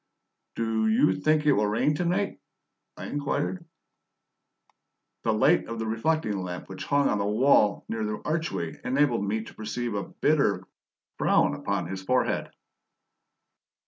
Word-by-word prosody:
"DO 115 -1 0
you 110 -3 +4
think 155 +5 +2
it 150 - +5
will 105 -6 +2
rain 110 +8 +1
to 150 - -1
night?" 195 +4 -1 0.6
I - - -7
inquired. 145 +4 -2 1.6
The - - +1
light - - +3
of 115 0 -5
a 110 - -2
reflecting 110 -2 0
lamp 90 -1 -6
which 95 - -7
hung 140 0 +2
on 105 - 0
the 100 - 0
wall 105 -1 +3
near 115 -1 -3
the 105 0 -3
archway 155 - -2
enabled 125 -4 +2
me 110 +2 -1
to - - -12
perceive 115 +2 -4
a 100 -1 -2
bitter 140 -12 +1 0.6
frown - - +3
upon - - -2
his 95 +2 -5
forehead. 125 +6 0
115 Hz, 145 wpm, -27 LUFS, 105-145 Hz, 1.6 s, it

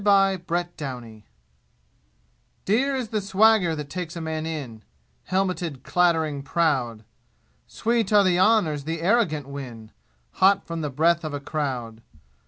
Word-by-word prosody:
Chapter 190 -4 +2
VIII 120 -7 -7 1.4
Dear 265 +7 +2
is 250 -4 -3
the 215 -2 -1
swagger 200 -3 +3
that 150 -2 -7
takes 180 -2 -5
a - - -4
man 160 0 -3
in 135 -9 -6 0.4
Helmeted, 180 -7 -2
clattering, 160 -5 +1
proud. 135 -7 0 0.6
Sweet 230 -2 -1
are 205 -1 +6
the 180 -2 +2
honors 180 -9 +3
the 165 +1 -3
arrogant 175 - +1
win, 125 -6 -8 0.5
Hot 195 +1 +5
from 165 -1 -4
the 150 - -2
breath 165 +5 +2
of 155 -2 -4
a - - -3
crowd. 130 -7 -4
165 Hz, 135 wpm, -24 LUFS, 140-190 Hz, 1.4 s, are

